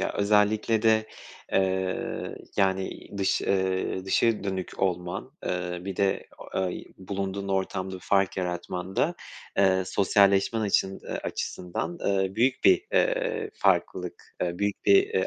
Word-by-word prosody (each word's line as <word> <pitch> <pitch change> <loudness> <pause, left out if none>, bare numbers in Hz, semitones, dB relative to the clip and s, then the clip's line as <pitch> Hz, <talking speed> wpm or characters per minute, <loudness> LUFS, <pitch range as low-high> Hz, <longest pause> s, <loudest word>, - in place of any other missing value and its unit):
ya, - - -1
özellikle 105 +2 +2
de, 110 -1 +4 0.5
eee, 95 -1 -1 0.2
yani, 95 -1 0
dış, 95 - +2
eee, 95 -1 0
dışa 110 +2 +2
dönük 95 -2 -4
olman, 90 -2 -1
eee, 90 -1 -2
bir 95 0 -4
de 100 -1 +1
o, - - -4
eee, - - -6
bulunduğun 100 +1 -4
ortamda 95 -1 -1
bir 90 - -8
fark 95 -2 +1
yaratman 90 +1 -4
da, - - +2 0.4
eee, 95 -1 +4
sosyalleşmen 100 +3 +3
açın, 95 -2 +1
eee, - - -8
açısından, 90 - -4
eee, 95 -1 +1
büyük 125 +4 +1
bir, 375 +2 +5
eee, - - +1
farklılık, 90 -1 0 0.2
eee, 90 0 -2
büyük 100 0 -1
bir, 395 - +6
eee, 445 +2 0
95 Hz, 140 wpm, -27 LUFS, 95-105 Hz, 0.5 s, bir